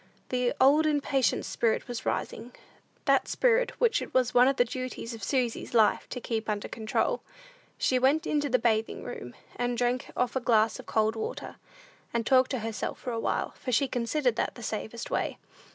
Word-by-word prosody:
The 250 -1 0
old, 290 +4 +5
impatient 280 -3 +1
spirit 230 -2 0
was 240 -2 -5
rising; 245 +1 -3 0.5
that - - +3
spirit - - +2
which 470 -2 +3
it - - -8
was 250 -1 +3
one 245 +1 +6
of 275 - +2
the 245 - +3
duties 255 -1 -5
of 225 -3 -9
Susy's 245 -1 -1
life 220 -2 +3
to 250 - -4
keep 225 -2 -3
under 210 -1 -2
control. 225 - -1 0.6
She 255 - +2
went 285 +6 +3
into 295 -2 0
the 255 - +4
bathing 225 -2 0
room, 125 - -7 0.2
and 245 0 -1
drank 245 +1 0
off 250 0 0
a - - +2
glass 225 -3 +2
of - - -11
cold 220 0 +1
water, 220 - -5 0.6
and 230 -1 0
talked 260 +1 +4
to 260 - -2
herself 225 +3 -4
a 235 -2 -2
while, - - -1
for 255 - -6
she 275 +3 +3
considered 245 0 0
that - - -1
the 240 - -10
safest 220 +2 -5
way. - - -1
245 Hz, 185 wpm, -28 LUFS, 230-265 Hz, 0.6 s, one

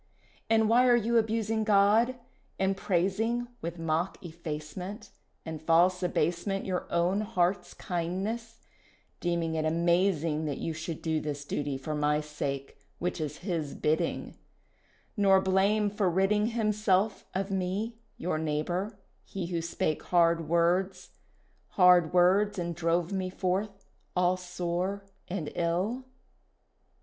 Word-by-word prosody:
"And 220 -1 +4
why 245 +3 +5
are 245 - +6
you 235 0 +3
abusing 220 0 0
God, 215 +4 +4 0.4
and 190 0 +1
praising 210 +6 0
With 170 -2 -5
mock 165 +2 -1
effacement 170 +5 -6 0.3
And 160 -1 -6
false 175 +3 +3
abasement 180 +3 0
Your 185 -2 -3
own 180 +4 +2
heart's 180 -3 0
kindness, 195 +7 -3 0.6
deeming 170 -2 -1
it 160 -1 0
amazing 170 -1 +1
That 145 -2 -2
you 165 - -3
should 160 0 -6
do 160 -1 0
this 145 -1 -4
duty 145 -1 -2
for 145 +4 -5
my 150 0 +1
sake, 145 -2 -5 0.2
Which 180 -1 -2
is 150 0 -4
His 165 -7 -2
bidding, 155 +1 -1 0.8
Nor 195 -3 +5
blame 200 +2 +2
for 205 -2 +1
ridding 195 +4 +2
Himself 215 -3 +1
of 195 +1 -1
me, 195 +5 -2 0.2
your 165 -2 -2
neighbour, 175 +7 -2 0.3
he 195 -3 -5
who 170 -1 -2
spake 165 -2 -1
hard 165 -2 +3
words, 180 +3 +1 0.6
Hard 180 -3 +6
words 195 +4 +4
and 170 -1 -2
drove 170 +2 0
me 190 -1 -1
forth 195 +2 -2 0.3
all 180 0 +3
sore 180 +2 -3 0.2
and 175 -5 -4
ill?" 185 +10 -1
180 Hz, 130 wpm, -29 LUFS, 165-200 Hz, 0.8 s, are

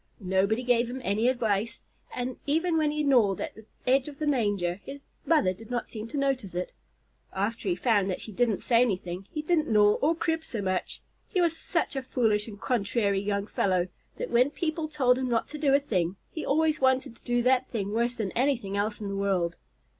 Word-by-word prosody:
Nobody 195 +4 +1
gave 240 -1 +2
him 255 +2 -5
any 215 +3 +1
advice, 225 -3 0 0.3
and 250 0 -4
even 325 +4 +1
when 310 -2 +2
he 300 0 -1
gnawed 235 -9 +3
at - - -4
the 220 - -14 0.2
edge 260 +2 +3
of 290 -2 -8
the 305 - -2
manger, 205 -9 0
his 280 0 -9 0.2
mother 300 - +3
did 215 +4 -13
not 245 -1 -2
seem 220 -1 -7
to 290 - -5
notice 270 -10 -1
it. 180 +1 -3 0.6
After 205 +1 -2
he 175 - +2
found 205 -1 +2
that 185 - -2
she 220 - -7
didn't 225 0 0
say 235 -2 +4
anything, 185 -5 -1
he 305 - -4
didn't 315 -1 +2
gnaw, 210 -1 +5
or 315 +4 +3
crib, 325 -1 -1
so 235 - -5
much. 185 -2 -2 0.2
He 375 - -1
was 340 -2 +2
such 335 -3 -1
a 270 - -1
foolish 220 -5 +1
and 205 -3 -9
contrary 205 -4 0
young 200 0 -1
fellow 185 -3 0 0.3
that - - -4
when 245 +3 +4
people 315 +1 -2
told 260 -5 +2
him 260 -1 -1
not 230 -1 +1
to 300 - -7
do 285 -2 +2
a 280 - +6
thing, 185 -10 -1 0.2
he 315 - -5
always 310 +1 +1
wanted 260 -3 +2
to - - -25
do 240 0 +1
that 255 +1 +3
thing 205 -4 -3
worse 235 +2 +1
than 215 -6 -3
anything 240 -6 0
else 210 +2 -1
in 205 - -3
the 200 - -3
world. 190 -3 0
235 Hz, 215 wpm, -28 LUFS, 200-275 Hz, 0.6 s, a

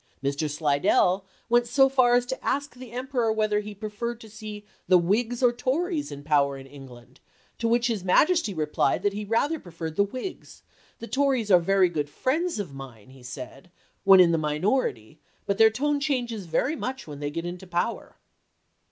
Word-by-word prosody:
Mr. 140 +3 -1
Slidell 150 +5 +2 0.2
went 240 0 +3
so 270 +3 +5
far 255 -2 +4
as 245 0 +2
to 260 +1 -5
ask 285 +2 -1
the 250 -2 -11
Emperor 250 -2 -1
whether 215 -1 +1
he 210 0 -7
preferred 220 +3 -5
to 220 - -13
see 210 -1 -8 0.2
the 185 - +6
Whigs 225 +8 0
or 245 -1 +5
Tories 295 - -1
in 145 0 -8
power 140 -2 +2
in 135 - -11
England, 130 -3 -14 0.4
to 230 - 0
which 235 +1 +2
his 225 -6 -1
Majesty 310 - +3
replied 150 -5 0
that 205 - +1
he 210 +1 -4
rather 280 +9 0
preferred 165 - -7
the 200 - +5
Whigs; 255 - -7 0.2
" - - -32
the - - -6
Tories 260 -4 0
are 180 - +8
very 190 +2 +3
good 150 -4 -3
friends 320 - -1
of 185 -9 -5
mine," 130 -4 -11
he 135 -1 -16
said, 130 +5 -9 0.2
" - - -41
when 195 -1 +8
in 175 -2 +6
the 165 - +1
minority, 150 - -1 0.3
but 200 +1 -1
their 220 0 +8
tone 285 +6 0
changes 240 - -2
very 270 - 0
much 265 -2 -5
when 145 -2 -9
they 145 0 -3
get 165 +3 -5
into 180 +2 -7
power." 175 +6 -3
210 Hz, 195 wpm, -26 LUFS, 155-245 Hz, 0.4 s, are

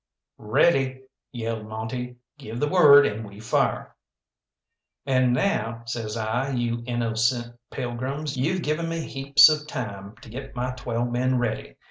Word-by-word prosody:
"Ready!" 130 +3 +2 0.3
yelled 115 -3 -4
Monte. 110 +3 -5 0.2
"Give 115 -3 -7
the 150 - +1
word, 145 -4 +7
and 105 +2 -2
we 100 -1 -11
fire." 110 - -1 1.1
"And 130 -2 +3
now," 115 - 0
says 115 -1 -4
I, 115 +5 -1
"you 120 -1 -1
innocent 120 0 0
pilgrims, 135 +4 -4
you've 165 +8 -1
given 160 +3 -1
me 165 0 -2
heaps 140 -1 +5
of 155 -1 0
time 100 -6 -6
to - - -12
get 135 +4 -8
my 125 +1 -2
twelve 120 -1 -3
men 130 +1 +1
ready. 120 -2 -3
125 Hz, 140 wpm, -25 LUFS, 115-135 Hz, 1.1 s, word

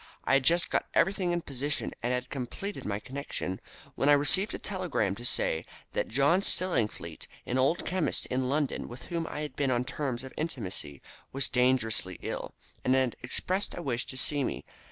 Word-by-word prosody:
I - - +1
had 135 -1 +5
just 170 +5 +3
got - - +1
everything 190 -2 +3
in 175 0 0
position, 145 0 -2
and 120 - 0
had 125 0 -2
completed 145 +10 -5
my 100 -1 -1
connection, 130 -7 -4 0.3
when 140 - +2
I - - +9
received 185 +8 +5
a - - -3
telegram 180 - -1
to 120 - -9
say 80 -8 +3 0.3
that - - 0
John 140 - +3
Stillingfleet, 110 - -1 0.2
an 125 - 0
old 140 +6 +2
chemist 185 -2 0
in 130 0 -1
London 145 0 0
with 125 +1 -9
whom 165 -1 -1
I 150 - -4
had 150 - -5
been 140 -2 +1
on 125 -1 +1
terms 130 -2 -3
of 130 - -9
intimacy, 100 - -4 0.3
was 135 0 +4
dangerously 125 -7 +2
ill, - - -4 0.3
and 130 - +3
had 130 -2 +2
expressed 185 +10 0
a 175 - -4
wish 125 -3 -2
to 130 - -4
see 145 +1 +3
me. - - -3
135 Hz, 190 wpm, -30 LUFS, 125-160 Hz, 0.3 s, I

